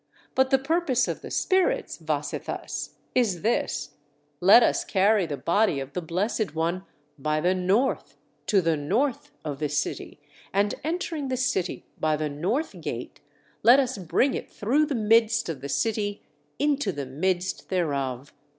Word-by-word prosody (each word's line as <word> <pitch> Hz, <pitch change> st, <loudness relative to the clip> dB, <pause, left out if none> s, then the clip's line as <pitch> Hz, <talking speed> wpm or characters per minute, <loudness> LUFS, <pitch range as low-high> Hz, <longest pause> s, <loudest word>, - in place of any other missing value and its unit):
But 265 Hz, 0 st, +3 dB
the 270 Hz, -, +5 dB
purpose 275 Hz, -2 st, +1 dB
of -, -, -4 dB
the -, -, -8 dB
spirits, 460 Hz, +6 st, +1 dB
Vasetthas, -, -, -4 dB, 0.2 s
is 205 Hz, -9 st, +1 dB
this: 175 Hz, -9 st, 0 dB, 0.5 s
'Let 200 Hz, +6 st, +8 dB
us -, -, +2 dB
carry 200 Hz, -1 st, +3 dB
the 145 Hz, -2 st, -4 dB
body 185 Hz, -2 st, +2 dB
of 135 Hz, +1 st, -7 dB
the 180 Hz, -, -2 dB
Blessed 190 Hz, +4 st, -1 dB
One 170 Hz, +4 st, -1 dB, 0.3 s
by 155 Hz, +2 st, 0 dB
the 180 Hz, +4 st, +2 dB
north 190 Hz, +8 st, 0 dB, 0.3 s
to 200 Hz, -4 st, +4 dB
the 165 Hz, -2 st, +2 dB
north 220 Hz, -, -1 dB, 0.2 s
of 145 Hz, -3 st, -4 dB
the 150 Hz, -1 st, -1 dB
city, -, -, -3 dB, 0.3 s
and 200 Hz, +1 st, +1 dB
entering 320 Hz, -2 st, -2 dB
the 260 Hz, -1 st, -1 dB
city 245 Hz, -8 st, -1 dB
by 155 Hz, -1 st, +2 dB
the 150 Hz, 0 st, -2 dB
north 190 Hz, -, -2 dB
gate, -, -, -6 dB, 0.4 s
let 245 Hz, +4 st, +7 dB
us 255 Hz, -5 st, -1 dB
bring 220 Hz, -, +1 dB
it -, -, -5 dB
through 280 Hz, +9 st, +1 dB
the 285 Hz, -, -2 dB
midst 225 Hz, -1 st, +3 dB
of 150 Hz, -5 st, -4 dB
the 140 Hz, -, -6 dB
city 205 Hz, +4 st, -1 dB, 0.3 s
into 285 Hz, -7 st, +1 dB
the 145 Hz, -5 st, -5 dB
midst 175 Hz, +7 st, -2 dB
thereof. 140 Hz, -7 st, -2 dB
200 Hz, 160 wpm, -26 LUFS, 160-255 Hz, 0.5 s, Let